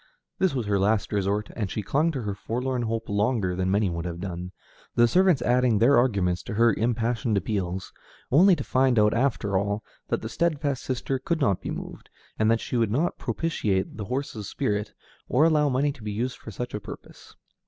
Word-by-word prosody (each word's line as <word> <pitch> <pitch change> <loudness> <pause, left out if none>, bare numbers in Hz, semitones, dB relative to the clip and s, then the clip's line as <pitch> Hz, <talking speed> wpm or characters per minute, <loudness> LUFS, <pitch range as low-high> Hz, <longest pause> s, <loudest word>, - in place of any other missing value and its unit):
This 190 -6 +2
was 125 -4 -1
her 100 -1 +1
last 105 +2 +1
resort, 100 +1 0
and 105 -5 -2
she 105 - -3
clung 150 - +1
to 130 -4 -3
her 105 -1 -2
forlorn 125 +5 -2
hope 115 -1 -2
longer 100 -2 0
than 95 0 -1
many 100 +1 +2
would 85 -1 -3
have 85 -1 -4
done, 90 -1 -5 0.4
the 120 0 +5
servants 180 -3 +3
adding 125 -2 +3
their 120 +7 +5
arguments 100 -8 +2
to 110 - -6
her 115 0 +4
impassioned 115 0 0
appeals, 95 -2 -3 0.4
only 180 +7 +6
to - - -4
find 130 -1 +2
out 105 0 +4
after 115 -6 +1
all 100 +2 -2 0.2
that - - -2
the - - -3
steadfast 145 0 -1
sister 130 +1 -2
could 165 +5 -1
not 100 - +1
be - - -5
moved, - - -7 0.3
and 110 0 +3
that 115 0 +2
she 125 - -2
would 115 -2 +2
not 145 +11 0
propitiate 105 - -1
the 105 - -4
horse's 120 -4 -4
spirit, 105 -6 -2 0.4
or 130 +5 +4
allow 150 -3 +3
money 140 +3 +1
to 135 - -13
be 105 -1 -4
used 120 +5 -3
for - - -10
such 120 +4 -5
a 105 - -2
purpose. - - -12
115 Hz, 205 wpm, -26 LUFS, 100-130 Hz, 0.4 s, only